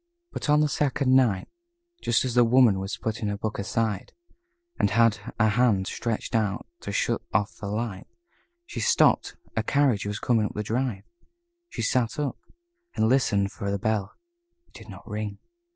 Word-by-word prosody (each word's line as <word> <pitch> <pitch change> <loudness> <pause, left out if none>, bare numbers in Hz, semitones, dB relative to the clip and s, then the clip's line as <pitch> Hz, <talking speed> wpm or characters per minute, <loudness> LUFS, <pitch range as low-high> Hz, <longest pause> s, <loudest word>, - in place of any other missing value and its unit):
But - - -4
on 150 0 +5
the 150 - +3
second 135 -2 +1
night, 115 -8 +3 0.5
just 120 +2 +2
as 125 - -2
the 120 0 +6
Woman 115 -4 +5
was 95 +2 -4
putting 110 -2 -3
her 100 0 -2
book 105 0 -4
aside, 105 -1 -2 0.7
and - - +3
had 115 0 +3 0.2
a 110 -1 +4
hand 105 -4 +2
stretched 115 +2 -3
out 105 -3 0
to 100 - -6
shut 100 - 0
off 100 +2 0
the 105 - -6
light, 105 -2 -4 0.6
she - - -6
stopped - - +3 0.2
a - - +2
carriage 135 -8 +1
was 105 0 -3
coming 110 -2 +1
up - - -11
the 105 - -2
drive. 115 -2 -2 0.7
She - - -4
sat 120 -3 +1
up, 145 -3 -2 0.6
and 110 - +2
listened 100 -7 +2
for 100 - -4
the 100 - 0
bell. 105 -1 -1 0.5
It - - -34
did - - -13
not 95 - -11
ring. 105 -2 -4
110 Hz, 175 wpm, -26 LUFS, 100-125 Hz, 0.7 s, the